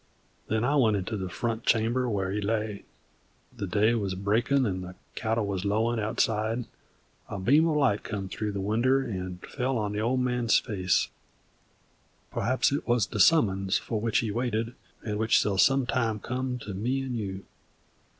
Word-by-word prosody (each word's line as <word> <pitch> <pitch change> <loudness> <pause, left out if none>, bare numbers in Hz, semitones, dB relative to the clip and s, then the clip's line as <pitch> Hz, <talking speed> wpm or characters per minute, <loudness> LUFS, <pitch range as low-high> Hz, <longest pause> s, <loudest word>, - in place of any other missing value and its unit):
Then 110 +1 0
I 140 +4 +2
went 110 -6 +4
into 100 +3 -3
the 95 -3 -4
front 115 +4 -3
chamber 120 +3 +2
where 95 -3 -1
he 105 +1 -1
lay. 105 -1 -2 0.7
The 100 - -4
day 105 +5 +3
wuz 100 -5 -1
breakin'; 115 +8 +1
the 90 -4 -3 0.2
cattle 110 0 -1
wuz 95 -2 -2
lowin' 110 +3 +1
outside; 110 +2 0 0.6
a 105 - -4
beam 140 - +4
of 155 - +1
light 130 -8 +2
come 100 -2 -4
through 105 +2 -3
the 100 - -3
winder 120 +7 +2
and 95 -5 -5
fell 130 -1 -2
on 105 -2 -1
the 105 - -2
Old 120 +4 +1
Man's 125 -2 +2
face, 95 -5 0 1.2
perhaps 130 +3 +1
it 140 - -2
wuz 120 -1 +3
the 105 - -3
summons 95 -9 +4
for 110 -2 -3
which 115 -1 +1
he 110 - -2
waited 115 0 -1 0.3
and 105 -2 -2
which 110 0 +4
shall 100 -2 +1
some 135 +2 +4
time 115 -3 0
come 125 +2 -3
to 105 -4 -7
me 125 +8 -1
'nd 130 -2 -4
you. 95 -3 -5
110 Hz, 175 wpm, -28 LUFS, 100-125 Hz, 1.2 s, went